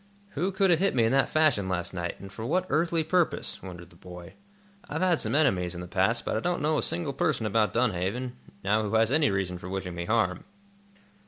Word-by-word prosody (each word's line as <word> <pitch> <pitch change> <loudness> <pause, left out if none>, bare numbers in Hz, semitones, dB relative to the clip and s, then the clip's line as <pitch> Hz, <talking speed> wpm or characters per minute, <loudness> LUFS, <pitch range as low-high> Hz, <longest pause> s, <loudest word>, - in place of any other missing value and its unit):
"Who 180 +4 -2
could 190 -1 +2
have 165 - +4
hit 195 -4 +1
me 120 - +3
in 115 - +2
that 135 +1 +3
fashion, 145 -12 +2
last 95 0 -2
night, 85 -1 -4
and 100 0 -10
for 110 - -7
what 180 +10 0
earthly 165 0 +1
purpose?" 175 +2 0
wondered 85 -2 -10
the - - -18
boy. 90 0 -11 0.6
"I've - - -2
had 180 -3 +2
some - - -1
enemies, 95 - +2
in 85 - -6
the 90 - -7
past, 105 +6 +1
but - - -1
I - - +1
don't 175 +9 -1
know 155 0 +2
a - - 0
single 160 -5 -1
person 115 - 0
about 105 0 +2
Dunhaven, 120 +2 -1 0.3
now 105 +2 +2
who 105 +1 -2
has 110 +1 +3
any 150 0 +3
reason 95 -2 -2
for 90 - -8
wishing 95 -2 -4
me 85 0 -4
harm." 110 -4 0
110 Hz, 230 wpm, -27 LUFS, 95-155 Hz, 0.6 s, have